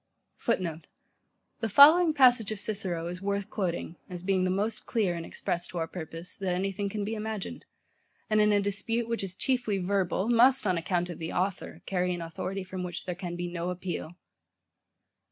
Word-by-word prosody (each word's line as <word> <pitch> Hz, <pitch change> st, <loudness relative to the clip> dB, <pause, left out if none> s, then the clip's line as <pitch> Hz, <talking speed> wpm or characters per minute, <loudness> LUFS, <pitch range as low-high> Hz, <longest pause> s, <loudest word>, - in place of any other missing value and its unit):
[Footnote: 170 Hz, -8 st, -2 dB, 0.7 s
The 225 Hz, -, -1 dB
following 315 Hz, -, +8 dB
passage 245 Hz, -6 st, +5 dB
of 215 Hz, -, -3 dB
Cicero 185 Hz, -6 st, -2 dB
is 180 Hz, +1 st, -5 dB
worth 200 Hz, +1 st, -2 dB
quoting, 170 Hz, -3 st, -2 dB
as 180 Hz, -1 st, -7 dB
being 185 Hz, -1 st, +2 dB
the -, -, +1 dB
most 205 Hz, +4 st, -1 dB
clear 210 Hz, -7 st, +1 dB
and 170 Hz, -1 st, -4 dB
express 175 Hz, +1 st, -3 dB
to 180 Hz, -, -7 dB
our 165 Hz, -, 0 dB
purpose, 165 Hz, +1 st, -7 dB
that 185 Hz, -2 st, 0 dB
any 195 Hz, +2 st, 0 dB
thing 200 Hz, +1 st, -3 dB
can 205 Hz, 0 st, -3 dB
be 220 Hz, -, -3 dB
imagined, 215 Hz, -2 st, -5 dB, 0.6 s
and, 215 Hz, 0 st, +3 dB
in 210 Hz, 0 st, +4 dB
a 205 Hz, -, +4 dB
dispute, 215 Hz, +4 st, -1 dB
which 230 Hz, 0 st, -1 dB
is 185 Hz, -1 st, -4 dB
chiefly 240 Hz, -3 st, +1 dB
verbal, 190 Hz, +1 st, 0 dB
must, 245 Hz, +2 st, +5 dB
on 185 Hz, -2 st, +2 dB
account 175 Hz, +1 st, -1 dB
of 170 Hz, -, -8 dB
the 165 Hz, 0 st, -4 dB
author, 190 Hz, +1 st, -2 dB
carry 180 Hz, -1 st, 0 dB
an 175 Hz, -, -6 dB
authority, 185 Hz, +4 st, -4 dB
from 185 Hz, 0 st, -6 dB
which 175 Hz, -1 st, -5 dB
there 180 Hz, -, -2 dB
can 175 Hz, -1 st, -5 dB
be 175 Hz, 0 st, -3 dB
no 175 Hz, 0 st, -3 dB
appeal. 175 Hz, -2 st, -4 dB
190 Hz, 190 wpm, -29 LUFS, 175-215 Hz, 0.7 s, following